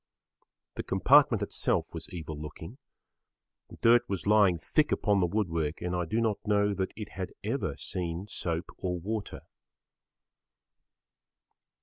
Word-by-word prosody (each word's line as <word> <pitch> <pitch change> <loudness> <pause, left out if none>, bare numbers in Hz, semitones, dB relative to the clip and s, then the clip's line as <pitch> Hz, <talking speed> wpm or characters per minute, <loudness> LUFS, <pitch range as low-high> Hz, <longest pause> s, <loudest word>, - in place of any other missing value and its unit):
The - - -1
compartment 120 +2 +4
itself - - -1
was - - -7
evil 80 -3 -6
looking. 80 - -9 1.0
Dirt 120 +1 +6
was 95 -4 -3
lying 100 -4 +5
thick 150 - +1
upon 105 -1 +2
the 90 - +3
wood 105 +3 0
work 80 -1 -2
and 90 0 -2
I 90 -1 -1
do 110 +7 -1
not 110 -3 +1
know 105 -1 +2
that 95 -1 -2
it 105 -1 -7
had 95 -1 -6
ever - - -2
seen 85 0 -3
soap 85 -4 -3
or 90 -1 -2
water. 105 +4 -4
95 Hz, 135 wpm, -29 LUFS, 85-105 Hz, 1.0 s, Dirt